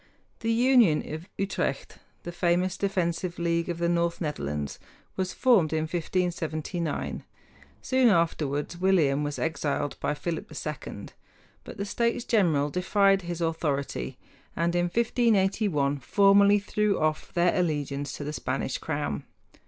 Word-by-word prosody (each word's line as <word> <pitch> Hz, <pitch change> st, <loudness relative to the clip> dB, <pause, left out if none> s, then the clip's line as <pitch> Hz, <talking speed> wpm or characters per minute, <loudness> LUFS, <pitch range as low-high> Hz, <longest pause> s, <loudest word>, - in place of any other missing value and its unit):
The 230 Hz, -, -1 dB
Union 235 Hz, -, +4 dB
of 160 Hz, +5 st, -7 dB
Utrecht, 195 Hz, 0 st, -2 dB, 0.2 s
the 175 Hz, -, -5 dB
famous 175 Hz, +2 st, +1 dB
defensive 180 Hz, -2 st, -1 dB
league 170 Hz, 0 st, 0 dB
of 170 Hz, -, -2 dB
the 170 Hz, 0 st, 0 dB
North 170 Hz, 0 st, 0 dB
Netherlands, 75 Hz, -, -3 dB, 0.4 s
was 185 Hz, -1 st, -2 dB
formed 225 Hz, -, +3 dB
in 160 Hz, -, +1 dB
1579. 170 Hz, -1 st, -2 dB, 0.6 s
Soon 260 Hz, -2 st, +4 dB
afterward 160 Hz, -5 st, 0 dB
William 160 Hz, -7 st, +3 dB
was 145 Hz, 0 st, -3 dB
exiled 145 Hz, -3 st, -2 dB
by 150 Hz, -, -1 dB
Philip 165 Hz, +1 st, -4 dB
II; 150 Hz, -9 st, -6 dB, 0.5 s
but -, -, -10 dB
the 200 Hz, -, -3 dB
States 235 Hz, +3 st, 0 dB
General 160 Hz, -, +2 dB
defied 195 Hz, +2 st, +3 dB
his 175 Hz, -1 st, -5 dB
authority, 145 Hz, -, -2 dB, 0.4 s
and 170 Hz, +1 st, 0 dB
in 175 Hz, 0 st, +2 dB
1581 195 Hz, -, +1 dB
formally 200 Hz, +8 st, +5 dB
threw 205 Hz, 0 st, 0 dB
off 155 Hz, 0 st, -1 dB
their 175 Hz, 0 st, +3 dB
allegiance 145 Hz, -5 st, -1 dB
to -, -, -6 dB
the 150 Hz, +1 st, -4 dB
Spanish -, -, -2 dB
crown. -, -, -3 dB
170 Hz, 130 wpm, -27 LUFS, 150-195 Hz, 0.6 s, formally